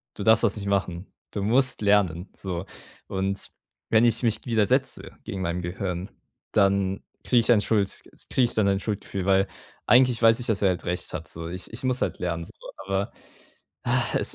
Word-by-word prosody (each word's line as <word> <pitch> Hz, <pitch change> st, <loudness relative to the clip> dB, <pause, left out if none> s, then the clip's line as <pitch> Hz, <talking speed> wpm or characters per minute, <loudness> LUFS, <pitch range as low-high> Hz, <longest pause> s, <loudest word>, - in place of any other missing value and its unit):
Du -, -, -5 dB
darfst 110 Hz, +2 st, +5 dB
das 110 Hz, -2 st, +2 dB
nicht 100 Hz, -, -5 dB
machen. 95 Hz, -2 st, -1 dB, 0.3 s
Du 100 Hz, -, -3 dB
musst 130 Hz, +3 st, +3 dB
lernen.“ 100 Hz, -4 st, +2 dB
So. 90 Hz, -1 st, -4 dB, 0.4 s
Und 95 Hz, +1 st, -2 dB, 0.4 s
wenn 115 Hz, +1 st, +5 dB
ich 115 Hz, +1 st, +2 dB
mich 115 Hz, -3 st, +1 dB
widersetze 125 Hz, +3 st, +1 dB
gegen 95 Hz, -, -4 dB
meinem 90 Hz, 0 st, -1 dB
Gehirn, 90 Hz, +1 st, -4 dB, 0.4 s
dann 100 Hz, -1 st, +2 dB, 0.2 s
kriege 125 Hz, -, +4 dB
ich 115 Hz, -, +2 dB
ein 110 Hz, -3 st, +5 dB
Schuld 105 Hz, -3 st, 0 dB, 0.3 s
kriege 130 Hz, -, +2 dB
ich 120 Hz, -, -2 dB
dann 110 Hz, -2 st, +3 dB
ein 100 Hz, 0 st, +2 dB
Schuldgefühl, 100 Hz, -3 st, -3 dB
weil 95 Hz, 0 st, +3 dB, 0.4 s
eigentlich 125 Hz, -1 st, +5 dB
weiß 115 Hz, +1 st, +6 dB
ich, 125 Hz, -, -4 dB
dass 110 Hz, -4 st, 0 dB
er 95 Hz, -, +5 dB
halt 90 Hz, -1 st, -2 dB
recht 90 Hz, 0 st, -3 dB
hat 80 Hz, -3 st, -5 dB
so. 80 Hz, 0 st, -6 dB
Ich 90 Hz, +3 st, -7 dB
ich 120 Hz, -, -7 dB
muss 130 Hz, 0 st, 0 dB
halt -, -, -1 dB
lernen 85 Hz, -2 st, -2 dB
so, -, -, -13 dB, 0.3 s
aber 95 Hz, +1 st, -1 dB, 1.1 s
es -, -, -2 dB
100 Hz, 190 wpm, -25 LUFS, 95-115 Hz, 1.1 s, weiß